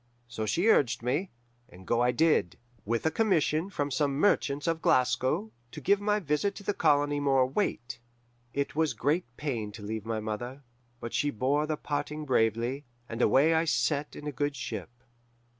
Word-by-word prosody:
So 110 Hz, -2 st, -4 dB
she 175 Hz, -, +1 dB
urged 135 Hz, -, +3 dB
me, 145 Hz, +10 st, -1 dB, 0.4 s
and 90 Hz, +1 st, -14 dB
go 120 Hz, +4 st, +1 dB
I 125 Hz, 0 st, +3 dB
did, 155 Hz, -, +2 dB, 0.3 s
with 115 Hz, +5 st, -1 dB
a 160 Hz, -, +3 dB
commission 170 Hz, -3 st, +1 dB
from 145 Hz, -7 st, -2 dB
some 140 Hz, +1 st, 0 dB
merchants 145 Hz, -4 st, +2 dB
of 165 Hz, -1 st, 0 dB
Glasgow, 125 Hz, -3 st, +2 dB, 0.2 s
to -, -, -7 dB
give 200 Hz, +1 st, +2 dB
my 210 Hz, 0 st, +1 dB
visit 175 Hz, +4 st, -1 dB
to -, -, -9 dB
the 205 Hz, -, 0 dB
colony 145 Hz, -4 st, +2 dB
more 135 Hz, -2 st, +3 dB
weight. 130 Hz, -, -2 dB, 0.5 s
"It 140 Hz, +2 st, -2 dB
was 160 Hz, -1 st, +1 dB
great 155 Hz, +6 st, 0 dB
pain 120 Hz, -8 st, -3 dB
to 105 Hz, -, -10 dB
leave 110 Hz, 0 st, -4 dB
my 115 Hz, -1 st, -1 dB
mother, 120 Hz, +6 st, -5 dB, 0.4 s
but 115 Hz, -, -6 dB
she 145 Hz, -, +1 dB
bore 145 Hz, +5 st, 0 dB
the 155 Hz, -1 st, -1 dB
parting 150 Hz, +1 st, -3 dB
bravely, 120 Hz, +2 st, +1 dB, 0.2 s
and 115 Hz, 0 st, -5 dB
away 145 Hz, +7 st, +4 dB
I 160 Hz, +1 st, +2 dB
set 150 Hz, -1 st, 0 dB
in 150 Hz, -, -9 dB
a 150 Hz, -, -2 dB
good 145 Hz, +2 st, -2 dB
ship. 115 Hz, -6 st, -5 dB
145 Hz, 180 wpm, -29 LUFS, 120-155 Hz, 0.5 s, away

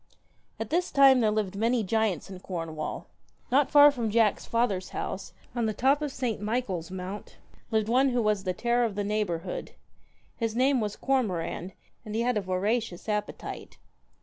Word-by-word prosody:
At -, -, -4 dB
this 355 Hz, +2 st, +1 dB
time 275 Hz, -2 st, +6 dB
there 220 Hz, -3 st, +3 dB
lived 210 Hz, -3 st, -1 dB
many 230 Hz, +3 st, +1 dB
giants 215 Hz, -4 st, 0 dB
in 190 Hz, -2 st, -9 dB
Cornwall. 165 Hz, -4 st, -5 dB, 0.5 s
Not 275 Hz, +2 st, +4 dB
far 290 Hz, 0 st, +8 dB
from 240 Hz, -5 st, -2 dB
Jack's 220 Hz, -1 st, +2 dB
father's 220 Hz, -6 st, 0 dB
house, 195 Hz, -, -5 dB, 0.2 s
on 235 Hz, -2 st, +1 dB
the 215 Hz, -, -2 dB
top 275 Hz, +6 st, +3 dB
of 300 Hz, -, -1 dB
S. 250 Hz, -5 st, -2 dB
Michael's 205 Hz, -6 st, -2 dB
Mount, 190 Hz, +2 st, -7 dB, 0.3 s
lived 220 Hz, -2 st, +1 dB
one 260 Hz, +4 st, +4 dB
who 245 Hz, -2 st, +1 dB
was 210 Hz, -2 st, +1 dB
the 185 Hz, -, 0 dB
terror 240 Hz, +6 st, +1 dB
of 220 Hz, -4 st, -1 dB
the 205 Hz, -, -1 dB
neighbourhood. 200 Hz, -5 st, -2 dB, 0.6 s
His 225 Hz, -2 st, -2 dB
name 260 Hz, +1 st, +3 dB
was 210 Hz, -1 st, -2 dB
Cormoran, 190 Hz, -8 st, -1 dB, 0.3 s
and 215 Hz, 0 st, -6 dB
he 225 Hz, -, +1 dB
had 245 Hz, 0 st, +1 dB
a 210 Hz, -, +1 dB
voracious 195 Hz, +2 st, -1 dB
appetite. 210 Hz, -1 st, -4 dB
220 Hz, 175 wpm, -28 LUFS, 195-245 Hz, 0.6 s, far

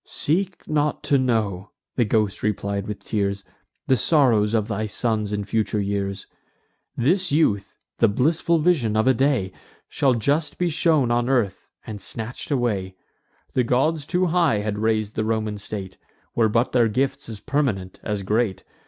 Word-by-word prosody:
"Seek 185 Hz, +4 st, -2 dB
not 150 Hz, -1 st, 0 dB
to 140 Hz, -, +3 dB
know," 105 Hz, -7 st, 0 dB, 0.3 s
the 120 Hz, -, +2 dB
ghost 105 Hz, -2 st, 0 dB
replied 100 Hz, -1 st, -2 dB
with 105 Hz, -1 st, -5 dB
tears, 100 Hz, -2 st, -1 dB, 0.4 s
"The 130 Hz, -, +3 dB
sorrows 115 Hz, -6 st, +3 dB
of 110 Hz, -2 st, +1 dB
thy 110 Hz, 0 st, -2 dB
sons 105 Hz, -1 st, -1 dB
in 105 Hz, -1 st, -2 dB
future 110 Hz, 0 st, 0 dB
years. 100 Hz, -1 st, -2 dB, 0.7 s
This 175 Hz, +8 st, +2 dB
youth 105 Hz, -10 st, +1 dB, 0.2 s
(the 115 Hz, -, +5 dB
blissful 155 Hz, +10 st, +2 dB
vision 150 Hz, -10 st, +2 dB
of 110 Hz, -, +2 dB
a 130 Hz, -, +5 dB
day) 130 Hz, -7 st, +1 dB, 0.4 s
Shall 135 Hz, -4 st, +2 dB
just 145 Hz, +7 st, 0 dB
be 180 Hz, -1 st, +1 dB
shown 155 Hz, -6 st, +2 dB
on 120 Hz, +1 st, +1 dB
earth, 120 Hz, -8 st, 0 dB, 0.2 s
and 105 Hz, -2 st, -7 dB
snatch'd 115 Hz, +5 st, -5 dB
away. 105 Hz, -9 st, -1 dB, 0.6 s
The 125 Hz, -, +2 dB
gods 145 Hz, +5 st, +1 dB
too 180 Hz, +1 st, +1 dB
high 165 Hz, -10 st, +2 dB
had 105 Hz, 0 st, -3 dB
rais'd 110 Hz, -1 st, 0 dB
the 110 Hz, -, -1 dB
Roman 110 Hz, -1 st, -1 dB
state, 100 Hz, -2 st, -6 dB, 0.3 s
Were 115 Hz, -2 st, +3 dB
but 115 Hz, +3 st, +1 dB
their 120 Hz, -2 st, +4 dB
gifts 130 Hz, +3 st, -1 dB
as 110 Hz, -2 st, -7 dB
permanent 120 Hz, -10 st, -2 dB
as 105 Hz, -2 st, -3 dB
great. 105 Hz, 0 st, 0 dB
115 Hz, 160 wpm, -23 LUFS, 105-140 Hz, 0.7 s, the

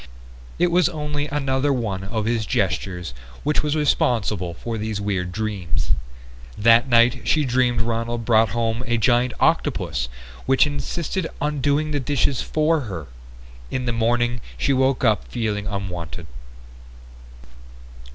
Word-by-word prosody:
It 175 Hz, 0 st, +2 dB
was 175 Hz, 0 st, +4 dB
only 150 Hz, -2 st, -3 dB
another 140 Hz, -1 st, 0 dB
one 105 Hz, -7 st, -2 dB
of 110 Hz, +2 st, -2 dB
his 115 Hz, -2 st, 0 dB
gestures 90 Hz, -5 st, -1 dB, 0.3 s
which 150 Hz, +1 st, +1 dB
was 150 Hz, 0 st, -1 dB
responsible 110 Hz, -, +1 dB
for 115 Hz, +4 st, -5 dB
these 110 Hz, -1 st, -3 dB
weird 95 Hz, -3 st, -2 dB
dreams. 95 Hz, -, -2 dB, 0.7 s
That 115 Hz, +4 st, +5 dB
night 120 Hz, 0 st, +4 dB
she 155 Hz, -2 st, +3 dB
dreamed 125 Hz, -2 st, +2 dB
Ronald 115 Hz, 0 st, -2 dB
brought 110 Hz, -1 st, +4 dB
home 115 Hz, +1 st, -1 dB
a 120 Hz, 0 st, +1 dB
giant 120 Hz, +2 st, +3 dB
octopus 90 Hz, -, +1 dB, 0.4 s
which 135 Hz, +2 st, +5 dB
insisted 165 Hz, +4 st, -3 dB
on 150 Hz, -1 st, -1 dB
doing 145 Hz, +2 st, +1 dB
the 145 Hz, -, 0 dB
dishes 135 Hz, 0 st, 0 dB
for 155 Hz, +1 st, +1 dB
her. 85 Hz, -6 st, -5 dB, 0.6 s
In 130 Hz, -1 st, -2 dB
the 120 Hz, -, 0 dB
morning 120 Hz, +1 st, +1 dB, 0.2 s
she 140 Hz, -, +2 dB
woke 130 Hz, 0 st, +2 dB
up 110 Hz, -4 st, +2 dB
feeling 105 Hz, -4 st, -2 dB
unwanted. 90 Hz, -5 st, -5 dB
120 Hz, 135 wpm, -22 LUFS, 105-140 Hz, 0.7 s, That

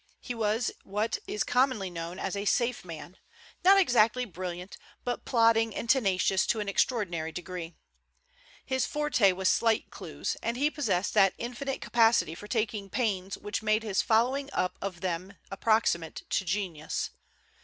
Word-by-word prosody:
He 245 Hz, -, -5 dB
was 225 Hz, +1 st, 0 dB
what 210 Hz, +3 st, -1 dB
is 210 Hz, -, -1 dB
commonly 250 Hz, -7 st, +1 dB
known 170 Hz, +1 st, -6 dB
as -, -, -3 dB
a 200 Hz, +1 st, -3 dB
safe 240 Hz, +3 st, +1 dB
man, 170 Hz, +1 st, -9 dB, 0.5 s
not 390 Hz, +2 st, +7 dB
exactly 250 Hz, -, +3 dB
brilliant, 180 Hz, -2 st, -6 dB, 0.3 s
but 245 Hz, -, -3 dB
plodding 225 Hz, -2 st, +3 dB
and -, -, -4 dB
tenacious 195 Hz, -6 st, +2 dB
to 225 Hz, -, +1 dB
an 210 Hz, -, -3 dB
extraordinary 185 Hz, -7 st, 0 dB
degree. 175 Hz, -1 st, -6 dB, 0.9 s
His 260 Hz, -1 st, 0 dB
forte 295 Hz, -10 st, +3 dB
was 185 Hz, +1 st, -1 dB
slight 225 Hz, +2 st, +2 dB
clues, -, -, -4 dB
and 235 Hz, +1 st, -2 dB
he 290 Hz, +3 st, +2 dB
possessed 205 Hz, -12 st, 0 dB
that 195 Hz, -1 st, +5 dB
infinite 250 Hz, +3 st, -4 dB
capacity 225 Hz, -8 st, +3 dB
for 205 Hz, +5 st, -10 dB
taking 215 Hz, -3 st, -2 dB
pains 195 Hz, -5 st, -1 dB
which 205 Hz, +1 st, -4 dB
made 215 Hz, 0 st, +2 dB
his 205 Hz, -3 st, +1 dB
following 255 Hz, +5 st, +2 dB
up 180 Hz, 0 st, 0 dB
of 185 Hz, -3 st, -5 dB
them 185 Hz, +2 st, -3 dB, 0.2 s
approximate 195 Hz, -5 st, +1 dB
to 190 Hz, -, +1 dB
genius. 175 Hz, -4 st, -2 dB
210 Hz, 155 wpm, -29 LUFS, 185-235 Hz, 0.9 s, not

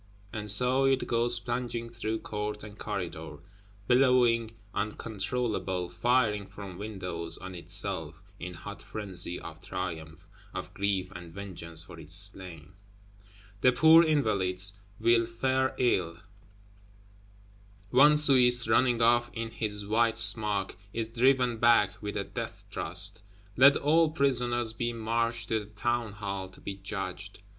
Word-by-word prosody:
And 105 Hz, -2 st, -4 dB
so 125 Hz, +6 st, +4 dB
it 135 Hz, -1 st, +1 dB
goes 120 Hz, +1 st, +1 dB
plunging 120 Hz, -1 st, -4 dB
through 110 Hz, -1 st, -4 dB
court 105 Hz, 0 st, -5 dB
and 105 Hz, -1 st, -11 dB
corridor; 85 Hz, -8 st, -6 dB, 0.5 s
billowing 120 Hz, -3 st, +2 dB, 0.2 s
uncontrollable, 105 Hz, -3 st, -3 dB
firing 105 Hz, 0 st, 0 dB
from 95 Hz, -3 st, -11 dB
windows 90 Hz, -6 st, -4 dB
on 95 Hz, 0 st, -9 dB
itself; 85 Hz, -2 st, -3 dB, 0.2 s
in 90 Hz, 0 st, -7 dB
hot 100 Hz, +6 st, -10 dB
frenzy 95 Hz, -4 st, -3 dB
of 80 Hz, 0 st, -11 dB
triumph, 90 Hz, -2 st, -7 dB, 0.3 s
of -, -, -7 dB
grief 100 Hz, -2 st, -2 dB
and 85 Hz, -2 st, -11 dB
vengeance 85 Hz, -4 st, -1 dB
for -, -, -13 dB
its 85 Hz, -, -3 dB
slain. 95 Hz, -3 st, -4 dB, 0.9 s
The 130 Hz, -, +5 dB
poor 160 Hz, +4 st, +6 dB
Invalides 100 Hz, -, +1 dB, 0.3 s
will 115 Hz, 0 st, +2 dB
fare 130 Hz, +3 st, -1 dB
ill; 90 Hz, -9 st, 0 dB, 1.7 s
one 145 Hz, +4 st, +6 dB
Swiss, 125 Hz, -5 st, +6 dB
running 120 Hz, +1 st, +2 dB
off 120 Hz, +1 st, +3 dB
in 115 Hz, 0 st, -5 dB
his 105 Hz, -2 st, -2 dB
white 115 Hz, +2 st, +1 dB
smock, 105 Hz, -3 st, +5 dB, 0.2 s
is 115 Hz, -1 st, -4 dB
driven 125 Hz, 0 st, +2 dB
back, 115 Hz, -4 st, +2 dB
with 105 Hz, 0 st, -5 dB
a 100 Hz, -, -2 dB
death -, -, -8 dB
thrust. 95 Hz, +6 st, +3 dB, 0.3 s
Let 140 Hz, +4 st, +6 dB
all 160 Hz, +2 st, +2 dB
prisoners 120 Hz, -6 st, +2 dB
be 120 Hz, +1 st, -3 dB
marched 115 Hz, 0 st, -2 dB
to 110 Hz, -, 0 dB
the 105 Hz, -, -17 dB
Town 120 Hz, 0 st, -3 dB
hall 100 Hz, -2 st, -5 dB
to 95 Hz, -, -18 dB
be 100 Hz, -, -6 dB
judged! 95 Hz, 0 st, -6 dB
110 Hz, 135 wpm, -28 LUFS, 95-120 Hz, 1.7 s, poor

